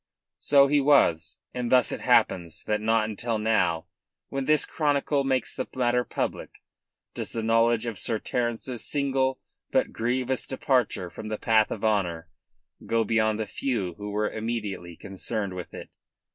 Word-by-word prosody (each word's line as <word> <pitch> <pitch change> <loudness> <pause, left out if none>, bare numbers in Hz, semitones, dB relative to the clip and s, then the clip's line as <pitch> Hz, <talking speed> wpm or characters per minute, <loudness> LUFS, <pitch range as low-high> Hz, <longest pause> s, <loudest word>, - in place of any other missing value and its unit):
So 140 -1 +5
he 145 +1 +3
was; 135 - +3 0.2
and 125 -1 -3
thus 125 -3 +5
it - - -4
happens 85 -2 +2
that 105 0 -1
not 110 0 +2
until 110 +2 -2
now 105 -7 +1 0.4
when 135 -1 -3
this 155 +1 +3
chronicle 145 -2 0
makes 130 -3 0
the - - -3
matter 125 -1 +2
public - - -4 0.5
does - - -5
the 115 - -2
knowledge 115 +1 +3
of 110 -5 -4
Sir 115 - 0
Terence's 120 +1 -3
single 135 -2 0 0.3
but - - +1
grievous 125 +3 -1
departure 125 -9 0
from 110 - -8
the 110 0 -3
path 110 -1 +3
of - - -4
honour 90 -6 0 0.6
go 115 0 +1
beyond 110 -1 +1
the 110 - -1
few 105 -5 -2
who 105 +4 -7
were 105 +1 0
immediately 105 -6 -4
concerned 100 +1 -4
with 90 -1 -7
it. - - -10
115 Hz, 160 wpm, -26 LUFS, 105-130 Hz, 0.6 s, So